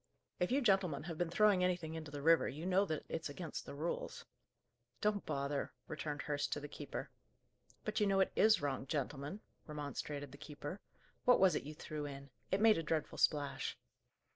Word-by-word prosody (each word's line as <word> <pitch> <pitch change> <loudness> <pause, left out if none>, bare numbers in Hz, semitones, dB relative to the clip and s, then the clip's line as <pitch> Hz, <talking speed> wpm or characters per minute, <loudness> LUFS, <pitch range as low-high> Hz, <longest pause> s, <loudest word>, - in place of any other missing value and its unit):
"If 180 - +1
you 275 +2 +3
gentlemen 190 - +3
have 165 -1 -5
been 175 -1 +1
throwing 200 0 +5
anything 175 -3 0
into 160 -2 -5
the 145 -1 -6
river 165 +1 +5
you 155 +5 -6
know 190 +2 +4
that 155 -5 -3
it's 160 -2 -3
against 160 +2 -5
the - - -6
rules." 160 +4 -3 0.7
"Don't 210 -1 +1
bother!" 140 0 -1
returned 150 -2 -3
Hurst, 145 -1 -1
to - - -2
the 145 - -6
keeper. - - -6 0.7
"But 215 0 0
you 210 - +4
know 195 -1 +3
it 190 - +3
is 215 -6 +5
wrong, 135 -1 -1
gentlemen," 145 +6 -3 0.3
remonstrated 145 -1 -4
the 140 - -12
keeper. 150 +4 -6 0.5
"What 250 - +7
was 190 -1 +6
it - - -1
you 150 +1 -7
threw 150 -1 -4
in? 140 -1 -8 0.2
It 190 +2 +1
made 220 -4 +7
a - - 0
dreadful 155 -1 -1
splash." 145 -2 +1
155 Hz, 190 wpm, -37 LUFS, 145-190 Hz, 0.7 s, What